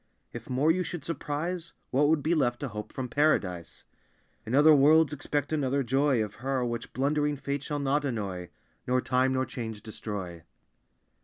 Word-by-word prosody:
If 120 +1 -8
more 135 +5 +3
you 185 +3 0
should 175 -4 -5
surprise, 165 +2 -3 0.2
What 145 +3 +3
would 150 -2 +2
be 165 - +2
left 120 -7 +1
to 145 - -3
hope 105 -1 -7
from 130 -1 -4
Paradise? 105 - 0 0.6
In 120 - 0
other 150 +2 +7
worlds 150 +2 +5
expect 145 0 -2
another 140 -2 +1
joy 135 -1 +2
Of 105 -1 -8
Her, 130 -1 0
which 120 -1 -4
blundering 145 +2 0
fate 140 +1 -3
shall 145 +1 -3
not 145 +1 +1
annoy, 100 -9 -3 0.4
Nor 125 0 +2
time 130 +1 +2
nor 130 0 +1
change 110 -5 -6
destroy." 100 -6 -6
135 Hz, 170 wpm, -28 LUFS, 120-150 Hz, 0.6 s, other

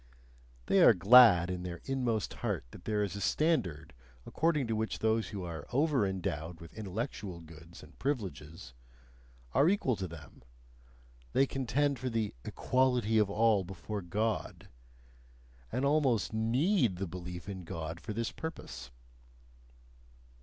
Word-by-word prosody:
They - - +4
are - - +8
glad 95 -2 +7
in 90 -1 -4
their 90 -1 -6
inmost 125 -6 -1
heart - - -2
that - - -13
there 105 -1 0
is 100 -1 -3
a 100 - -5
standard 100 - 0 0.3
according 155 -4 +1
to 115 -1 -1
which 110 0 -2
those 110 0 +1
who 100 -3 -6
are 80 -4 -6
over 140 -4 +2
endowed 85 -3 -4
with 85 -1 -12
intellectual 100 -3 -5
goods 85 +1 -13
and 75 - -17
privileges, 95 - -4 0.8
are 140 +5 +5
equal 180 - +1
to 95 -1 -3
them, 85 -2 -12 0.9
they 135 - +4
contend 135 +1 0
for 130 +1 -2
the 115 -3 -1
"equality 125 -4 +1
of 105 -2 +2
all 105 -1 +3
before 95 +3 -6
God," 105 +5 -3 1.0
and 125 +4 -1
almost 140 -7 +2
NEED 120 - +2
the 95 +2 -3
belief 90 0 -7
in 95 -2 -6
God 80 0 -6
for 110 - -7
this 115 +2 -2
purpose. 65 - -7
105 Hz, 140 wpm, -32 LUFS, 90-125 Hz, 1.0 s, are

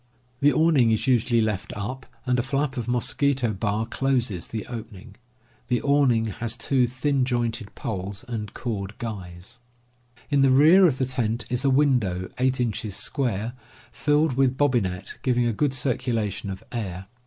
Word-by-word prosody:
The 145 +1 +5
awning 155 -8 +4
is 110 -1 +1
usually 120 -2 +3
left 105 -3 -2
up, 130 +6 -5 0.2
and 125 -1 +1
a - - +3
flap 135 +1 -1
of 120 -3 -4
mosquito 125 0 +1
bar 105 +2 -1
closes 120 -7 -1
the 110 -2 -5
opening. 110 -3 -9 0.5
The 125 -1 +1
awning 140 -6 +3 0.2
has 120 0 -1
two 125 +1 +2
thin 130 +2 0
jointed 120 -4 -2
poles 100 +1 -5
and 110 -3 -4
cord 105 -3 -4
guys. 100 0 -7 0.7
In 140 -1 +4
the 135 - +5
rear 160 +8 +7
of 135 -6 0
the 130 - +1
tent 115 -2 -2
is 125 +1 0
a 140 - +3
window, 125 -10 +2
8 130 0 +1
inches 110 -3 -2
square, 120 -4 -2 0.4
filled 150 0 +2
with 130 0 +2
bobbinet, 100 -10 0
giving 125 -2 +1
a 120 - +1
good 145 +5 +1
circulation 115 -6 -1
of 95 0 -6
air. 95 -6 -4
120 Hz, 160 wpm, -25 LUFS, 110-130 Hz, 0.7 s, rear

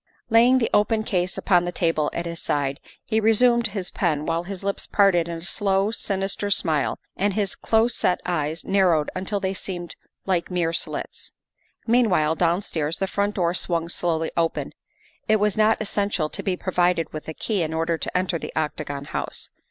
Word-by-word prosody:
Laying 240 +3 +6
the 235 - +1
open 215 +1 +3
case 180 -3 -1
upon 180 -3 +3
the 175 - -2
table 165 -4 +1
at 170 - -4
his 170 -1 -5
side, 140 -1 -1 0.3
he 220 -1 +1
resumed 235 +2 +4
his 195 -4 -3
pen 155 -5 0
while 165 0 0
his 190 +2 -6
lips 200 0 -2
parted 190 -5 +3
in 170 -1 -4
a - - -9
slow, 195 +1 +1
sinister 195 -1 -1
smile 160 -7 +1 0.2
and 200 0 0
his 205 -4 0
close 225 +1 +2
set 180 - +1
eyes 160 -2 -2
narrowed 180 -6 +2
until 190 +2 -2
they 190 -1 -1
seemed 175 -3 -5 0.3
like 180 -3 0
mere 175 -3 0
slits. - - -4 0.5
Meanwhile 215 -10 +3
downstairs 165 -2 0
the 195 - 0
front 200 +1 -1
door 175 -3 +1
swung 170 -2 -1
slowly 165 -2 0
open; 165 -1 -1 0.6
it 215 - +4
was 210 -1 +1
not 215 +1 +3
essential 200 -6 -1
to - - -5
be 185 -2 -1
provided 180 -3 0
with 155 - -7
a 160 - -4
key 210 -5 -1
in 160 -1 -1
order 165 +1 0
to - - -2
enter 180 -2 0
the - - -6
Octagon 150 -2 -3
House. - - -3
180 Hz, 185 wpm, -24 LUFS, 165-205 Hz, 0.6 s, Laying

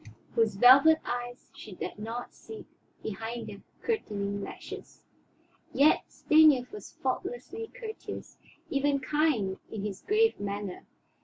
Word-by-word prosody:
Whose 220 -3 +2
velvet 270 +9 +8
eyes 245 0 -5
she 215 - -10
dared 180 - -6
not 230 +3 -5
seek 440 -1 -10 0.4
behind 225 +3 -4
their 200 -1 -9 0.2
curtaining 205 - -2
lashes. - - -9 0.7
Yet 295 +3 +4
Stanief 305 -5 +5
was 420 - -10
faultlessly 455 -2 -3
courteous, 445 -2 -8 0.3
even 280 0 +2
kind 265 -9 +1
in 210 -2 -5
his 200 -2 -5
grave 445 +2 +2
manner. 200 -2 -5
245 Hz, 120 wpm, -29 LUFS, 210-315 Hz, 0.7 s, velvet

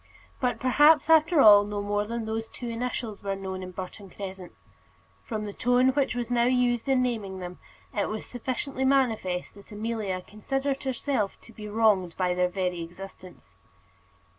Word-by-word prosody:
But 245 -3 0
perhaps, 295 +4 +5
after 320 -1 +5
all, 205 -3 +9
no 205 0 -4
more 205 0 -1
than 230 0 -3
those 225 0 -3
two 245 - -7
initials 230 -2 -4
were 195 -1 -2
known 190 -1 -5
in 185 - -6
Burton 185 +2 -8
Crescent. 190 -2 -8 0.7
From 215 -2 -4
the 205 - -6
tone 245 +3 +3
which 270 -1 +1
was 245 -1 -3
now 240 -1 +3
used 250 0 +1
in 260 -1 +3
naming 215 -6 -2
them, 180 -1 -7 0.4
it 205 - 0
was 215 0 -4
sufficiently 260 +2 -4
manifest 225 -10 +1
that 200 +2 -16
Amelia 210 -3 -3
considered 270 +6 -2
herself 260 -5 -1
to 230 - -16
be 210 -1 -8
wronged 205 -5 +2
by 180 -1 +1
their 180 0 +1
very 180 -2 -2
existence. 185 +2 -11
220 Hz, 165 wpm, -27 LUFS, 195-250 Hz, 0.7 s, all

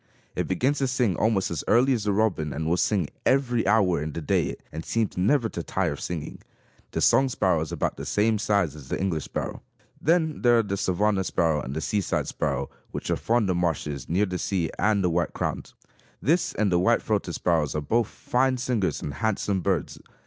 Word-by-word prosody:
It - - -1
begins 140 +3 +1
to 135 - +1
sing 125 -7 +1
almost 100 -1 +1
as 85 - -3
early 125 +4 +4
as 110 -4 -2
the 105 - +2
robin 95 -8 0
and 80 +2 -3
will 85 - +2
sing 90 -2 +1
every 125 -5 +2
hour 100 -7 +3
in 75 0 -4
the - - -4
day 75 - 0 0.2
and 80 +2 -6
seems 115 +1 -1
never 115 +7 +2
to 85 - -5
tire 90 0 -1
of 75 - -6
singing. 85 -4 -5 0.5
The - - -3
song 135 0 +4
sparrow 95 -9 +1
is 80 - -4
about - - -2
the - - -6
same 110 +1 +2
size 100 -8 +1
as 75 -4 -11
the - - -3
English 85 -5 -1
sparrow. - - -4 0.4
Then 160 -1 +1
there 120 -1 +5
are 115 - +3
the 100 -2 -2
savanna 100 +1 +1
sparrow 80 -4 +1
and 65 +2 -6
the 80 - -2
seaside 100 +1 -1
sparrow 70 -2 -2 0.2
which - - -4
are - - +3
fond 115 -2 +1
of 90 - 0
marshes, 75 -5 -2
near 95 +5 +2
the 90 -2 -4
sea; 90 -5 -1
and 100 0 +2
the 90 - +2
white 85 +1 0
crowned. - - -3 0.5
This 165 +6 +1
and 105 -3 +1
the 90 - +3
white 90 - +3
throated - - -1
sparrows 80 -5 +1
are 75 - 0
both 115 +9 +1
fine 130 +3 0
singers 120 -6 -1
and 70 - -4
handsome 100 -2 -1
birds. 95 -3 -1
95 Hz, 215 wpm, -26 LUFS, 85-115 Hz, 0.5 s, there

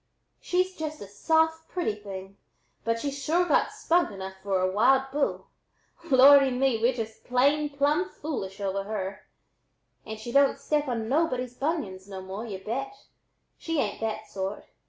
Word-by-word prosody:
She's 365 +1 0
just 310 -1 -5
a 200 - -8
soft 320 +9 +1
pretty 350 -12 -1
thing, 195 -1 -9 0.5
but 230 0 0
she's 280 +2 -4
sure 345 +5 +2
got - - +2
spunk 345 +1 +1
enough 190 -2 -7
for 195 -1 0
a 185 0 +1
wild 265 +6 +3
bull. 285 +1 -1 0.6
Lordy 275 +1 +8
me! 255 -2 +1
we're 240 +2 +4
just 220 -2 -6
plumb 290 +6 +2
foolish 225 - -5
over 195 0 -2
her, 200 -2 -5 0.8
and 220 0 -7
she 235 +2 -6
don't 280 +1 +4
step 295 -1 0
on 230 -3 -2
nobody's 255 -3 0
bunions 245 - -3
no 190 -1 -6
more, 190 +5 -6
y'u 190 -3 -7
bet! 270 +5 -3 0.7
She 330 -2 -2
ain't 210 -5 -2
that 220 -1 -3
sort. 195 +1 -5
250 Hz, 155 wpm, -27 LUFS, 200-295 Hz, 0.8 s, Lordy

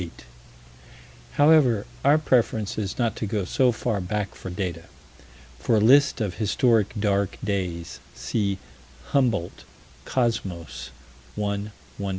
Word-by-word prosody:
However, 145 -8 +4 0.2
our 145 +2 +5
preference 115 -8 +1
is 100 -3 -3
not 120 -2 0
to 110 - -3
go 100 -2 -1
so 125 +6 +3
far 110 -3 -2
back 100 +2 -3
for - - -8
data. 90 -3 -4 0.7
For 110 - +1
a - - +4
list 135 +5 +5
of 100 -5 -2
historic 110 -1 +2
"dark 100 -2 0
days," 90 -5 -3 0.2
see 100 -3 -1 0.5
Humboldt, 115 -11 0 0.4
Cosmos, 100 -9 -2 0.5
1 100 0 -2 0.3
120. 100 -1 -2
105 Hz, 120 wpm, -25 LUFS, 95-120 Hz, 0.7 s, our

